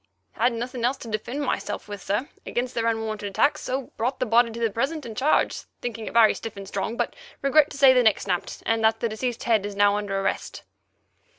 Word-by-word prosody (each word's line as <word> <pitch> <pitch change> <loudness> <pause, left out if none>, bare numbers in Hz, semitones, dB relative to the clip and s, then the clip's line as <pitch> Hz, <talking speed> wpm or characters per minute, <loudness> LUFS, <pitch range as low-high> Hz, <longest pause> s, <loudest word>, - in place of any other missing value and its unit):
Had 240 +2 +1
nothing 240 +1 -4
else 255 +3 +1
to - - -10
defend 230 +6 -3
myself 265 - -3
with, 205 -2 -7
sir, 210 +10 -1 0.2
against 245 +1 -2
their 230 -1 0
unwarranted 220 -2 -2
attacks, 285 +9 +2
so 260 0 -3
brought 245 +4 -1
the 255 - +1
body 235 +1 +4
to 230 +1 -7
the 230 -2 +1
present 275 +7 -2
and 225 -2 -7
charged, 280 +7 +1
thinking 230 -2 -5
it - - -6
very 225 -2 +7
stiff 225 -3 -7
and 195 -1 -8
strong, 200 +4 -3
but - - -1 0.3
regret 295 +2 +5
to 290 - -9
say 270 -1 +7
neck 220 -4 +4
snapped, 180 -3 -3
and 225 0 +1
that 220 0 +4
deceased's 235 +1 -2
head 220 -4 +2
is 205 0 -5
now 205 0 +4
under 200 -1 -2
arrest." 195 - -3
230 Hz, 215 wpm, -25 LUFS, 210-250 Hz, 0.3 s, very